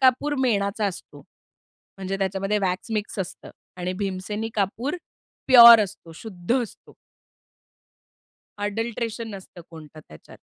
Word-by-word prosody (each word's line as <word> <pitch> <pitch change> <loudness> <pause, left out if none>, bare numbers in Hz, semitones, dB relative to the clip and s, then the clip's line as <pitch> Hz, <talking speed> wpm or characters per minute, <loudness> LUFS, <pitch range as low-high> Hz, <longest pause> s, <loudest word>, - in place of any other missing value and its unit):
कापूर 265 +3 +3
मेणाचा 205 -4 0
असतो. 190 - -8 0.8
म्हणजे 195 0 -4
त्याच्यामध्ये 195 +2 -1
वॅक्स 190 +2 -3
मिक्स 210 -1 -3
असतं 190 -1 -6 0.3
आणि 180 0 -3
भीमसेनी 200 +3 -4
कापूर 225 - -2 0.5
प्युअर 235 -3 +10
असतो, 175 -4 -8
शुद्ध 220 +6 -2
असतो. 225 - -12 1.7
अडल्टरेशन 225 +2 -3
नसतं 185 -2 -12
कोणतं 155 -2 -12
त्याच्यात. 75 - -15
205 Hz, 110 wpm, -24 LUFS, 185-230 Hz, 1.7 s, प्युअर